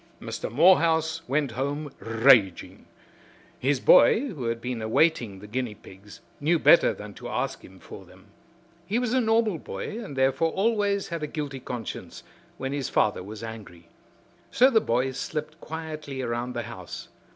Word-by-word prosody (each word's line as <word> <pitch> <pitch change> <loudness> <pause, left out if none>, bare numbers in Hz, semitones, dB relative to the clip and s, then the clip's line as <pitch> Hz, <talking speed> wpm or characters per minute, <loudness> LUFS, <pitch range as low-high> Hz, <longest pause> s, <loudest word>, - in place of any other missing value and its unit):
Mr. - - -5
Morehouse 160 +1 +4
went 140 -1 0
home 140 +4 -3
raging. 115 -4 +3 0.7
His 135 +1 +1
boy, 235 - +5
who 145 - -6
had 115 0 -1
been 125 -1 -4
awaiting 115 -2 +1
the 100 - -12
guinea 115 0 -3
pigs, 100 +1 -15 0.2
knew 160 +4 +2
better 170 - +6
than 105 0 -9
to 120 +3 -9
ask 125 +2 -3
him 95 - -14
for 95 - -11
them. 95 +1 -19 0.6
He 210 +5 0
was 245 -1 -1
a 260 - +3
normal 220 -5 +2
boy 225 +9 -6
and 165 -10 -8
therefore 135 +5 +1
always 205 -1 0
had 170 -2 -4
a 150 - -2
guilty 145 -3 -5
conscience 115 - -7 0.3
when 135 -2 -4
his 140 -3 -3
father 105 -3 +1
was 105 +4 -9
angry. 105 -7 -10 0.6
So 260 +2 +5
the 220 -3 +4
boy 125 +3 0
slipped 155 +4 -5
quietly 155 -4 -6
around 120 +1 -3
the 120 - -2
house. 95 -7 -8
135 Hz, 160 wpm, -26 LUFS, 115-165 Hz, 0.7 s, better